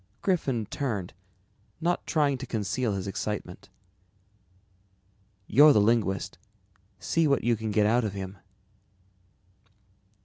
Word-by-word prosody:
Griffin 135 Hz, -, 0 dB
turned, 105 Hz, -6 st, -4 dB, 0.7 s
not 175 Hz, +1 st, -1 dB
trying 145 Hz, -4 st, +2 dB
to 130 Hz, 0 st, -7 dB
conceal 110 Hz, +1 st, -1 dB
his 95 Hz, -2 st, -3 dB
excitement. 100 Hz, -2 st, -5 dB, 1.8 s
"You're 145 Hz, +8 st, +7 dB
the -, -, +4 dB
linguist, 100 Hz, -5 st, 0 dB, 0.6 s
see 155 Hz, -, +1 dB
what 140 Hz, -2 st, +1 dB
you 120 Hz, 0 st, +2 dB
can 110 Hz, 0 st, -4 dB
get 105 Hz, 0 st, +2 dB
out 120 Hz, +3 st, +3 dB
of 105 Hz, -3 st, -2 dB
him." 95 Hz, 0 st, -6 dB
110 Hz, 110 wpm, -27 LUFS, 100-135 Hz, 1.8 s, You're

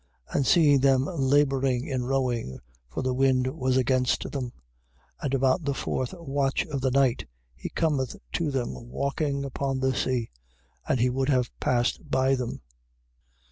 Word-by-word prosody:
6:48. -, -, -8 dB
And 135 Hz, -, +2 dB
seeing 145 Hz, -5 st, +5 dB
them 135 Hz, 0 st, +3 dB
labouring 135 Hz, -4 st, +2 dB
in 130 Hz, -3 st, -2 dB
rowing, 125 Hz, -, -1 dB, 0.3 s
(for 65 Hz, -, -4 dB
the 130 Hz, 0 st, 0 dB
wind 130 Hz, -1 st, +3 dB
was 130 Hz, -3 st, +1 dB
against 130 Hz, 0 st, +1 dB
them,) 130 Hz, -4 st, -3 dB, 0.7 s
and 140 Hz, -, -2 dB
about 135 Hz, +5 st, +2 dB
the 140 Hz, -1 st, -1 dB
fourth 130 Hz, +4 st, -2 dB
watch 140 Hz, -4 st, -1 dB
of 140 Hz, -4 st, -4 dB
the 130 Hz, -, +2 dB
night, 130 Hz, -2 st, +2 dB, 0.3 s
he -, -, -7 dB
cometh 140 Hz, -6 st, 0 dB, 0.2 s
to 170 Hz, -3 st, 0 dB
them 130 Hz, -3 st, -2 dB, 0.2 s
walking 140 Hz, +1 st, -1 dB
upon 135 Hz, 0 st, -2 dB
the 130 Hz, 0 st, +1 dB
sea, 125 Hz, -2 st, -1 dB, 0.6 s
and 130 Hz, -, +1 dB
he 125 Hz, +2 st, +3 dB
would 135 Hz, +2 st, 0 dB
have 125 Hz, -3 st, +2 dB
passed 125 Hz, +5 st, 0 dB
by 130 Hz, 0 st, +2 dB
them. 125 Hz, -3 st, -3 dB
130 Hz, 160 wpm, -27 LUFS, 130-140 Hz, 0.7 s, seeing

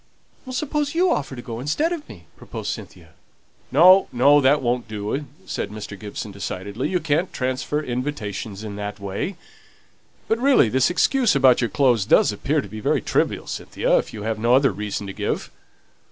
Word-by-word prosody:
"Suppose 290 Hz, +3 st, -2 dB
you 360 Hz, +1 st, +3 dB
offer 135 Hz, -2 st, -2 dB
to 120 Hz, -, -8 dB
go 115 Hz, -2 st, -6 dB
instead 290 Hz, -, 0 dB
of 320 Hz, -4 st, -7 dB
me?" 85 Hz, -4 st, -12 dB
proposed -, -, -6 dB
Cynthia. 85 Hz, -3 st, -9 dB, 0.6 s
"No, 185 Hz, +8 st, +7 dB
no! 140 Hz, +4 st, +5 dB
that 135 Hz, +1 st, +3 dB
won't 120 Hz, 0 st, 0 dB
do," 110 Hz, +7 st, -4 dB, 0.2 s
said -, -, -3 dB
Mr. 105 Hz, -1 st, -7 dB
Gibson, 105 Hz, +1 st, -7 dB
decidedly. 100 Hz, +5 st, -4 dB
"You 180 Hz, 0 st, +1 dB
can't 160 Hz, +3 st, 0 dB
transfer 130 Hz, +4 st, -2 dB
invitations 115 Hz, -6 st, -4 dB
in 105 Hz, -2 st, -6 dB
that 105 Hz, 0 st, -5 dB
way. 100 Hz, -, -4 dB, 0.9 s
But, 225 Hz, -, +1 dB
really, 260 Hz, -, +4 dB
this 130 Hz, +3 st, +2 dB
excuse 235 Hz, -, +2 dB
about 130 Hz, -2 st, +5 dB
your 120 Hz, -, 0 dB
clothes 125 Hz, -8 st, +2 dB
does -, -, +5 dB
appear 140 Hz, +9 st, 0 dB
to -, -, -9 dB
be 110 Hz, -, -8 dB
very -, -, +1 dB
trivial, -, -, 0 dB
Cynthia, -, -, -1 dB
if -, -, -5 dB
you 105 Hz, -, -7 dB
have 110 Hz, 0 st, -2 dB
no 120 Hz, +3 st, +4 dB
other 135 Hz, +1 st, +4 dB
reason 105 Hz, -1 st, -4 dB
to 95 Hz, -, -6 dB
give." -, -, -3 dB
125 Hz, 180 wpm, -22 LUFS, 105-150 Hz, 0.9 s, No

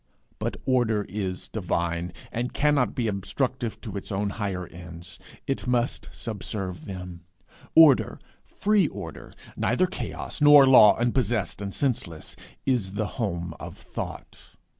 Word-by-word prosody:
But -, -, -2 dB
order 115 Hz, -5 st, +2 dB
is 95 Hz, -2 st, -4 dB
divine, 85 Hz, -3 st, -2 dB, 0.2 s
and 120 Hz, +2 st, -3 dB
cannot 145 Hz, -4 st, +2 dB
be 120 Hz, -3 st, 0 dB
obstructive 120 Hz, +4 st, -2 dB
to 105 Hz, -5 st, -7 dB
its 100 Hz, -, -6 dB
own 100 Hz, +1 st, -1 dB
higher 95 Hz, -3 st, -3 dB
ends; 85 Hz, 0 st, -10 dB, 0.3 s
it 135 Hz, -2 st, -2 dB
must 120 Hz, -1 st, 0 dB
subserve 95 Hz, -6 st, -5 dB
them. 90 Hz, -3 st, -7 dB, 0.5 s
Order, 155 Hz, -5 st, +6 dB, 0.2 s
free 205 Hz, -4 st, +2 dB
order, 90 Hz, -, -8 dB, 0.2 s
neither 125 Hz, +10 st, +2 dB
chaos, 180 Hz, -, -5 dB
nor 145 Hz, -1 st, +9 dB
law 130 Hz, -5 st, +8 dB
unpossessed 120 Hz, -5 st, 0 dB
and 100 Hz, -1 st, -4 dB
senseless, 100 Hz, -, -2 dB, 0.3 s
is 115 Hz, -8 st, 0 dB
the 110 Hz, +4 st, -3 dB
home 85 Hz, -5 st, -2 dB
of -, -, -8 dB
Thought. -, -, -8 dB
105 Hz, 130 wpm, -26 LUFS, 90-125 Hz, 0.5 s, nor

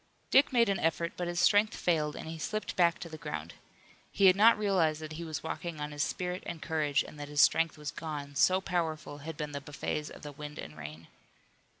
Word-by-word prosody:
Dick 275 Hz, +2 st, +6 dB
made 235 Hz, -2 st, +4 dB
an 195 Hz, -2 st, +1 dB
effort, 170 Hz, +1 st, 0 dB
but 175 Hz, -, -3 dB
his 175 Hz, 0 st, -2 dB
strength 205 Hz, +5 st, +4 dB
failed 155 Hz, -4 st, 0 dB
and -, -, -7 dB
he 160 Hz, 0 st, -6 dB
slipped 215 Hz, +7 st, -3 dB
back 170 Hz, -2 st, +4 dB
to -, -, -7 dB
the 160 Hz, -1 st, -9 dB
ground. 80 Hz, -, -5 dB, 0.6 s
He 200 Hz, -, +3 dB
had 185 Hz, -1 st, +8 dB
not 220 Hz, +3 st, +6 dB
realized 185 Hz, -7 st, +2 dB
that 155 Hz, 0 st, -7 dB
he 165 Hz, +2 st, -6 dB
was 160 Hz, -2 st, -5 dB
walking 160 Hz, 0 st, -4 dB
on 150 Hz, 0 st, -4 dB
his 145 Hz, 0 st, -4 dB
spirit 180 Hz, +3 st, -2 dB
and 170 Hz, -, -5 dB
courage 155 Hz, -3 st, +1 dB
and 150 Hz, -, -12 dB
that 145 Hz, -, -5 dB
his 145 Hz, 0 st, -3 dB
strength 165 Hz, -1 st, +4 dB
was 150 Hz, -1 st, -5 dB
gone, 150 Hz, -3 st, -6 dB
so 185 Hz, +7 st, +4 dB
powerful 160 Hz, -5 st, -2 dB
had 155 Hz, +1 st, -7 dB
been 150 Hz, -1 st, -4 dB
the 140 Hz, 0 st, -5 dB
buffets 145 Hz, +1 st, -4 dB
of -, -, -12 dB
the 145 Hz, -, -6 dB
wind 150 Hz, +1 st, -8 dB
and 75 Hz, -, -8 dB
rain. 75 Hz, +1 st, -9 dB
160 Hz, 230 wpm, -31 LUFS, 150-175 Hz, 0.6 s, had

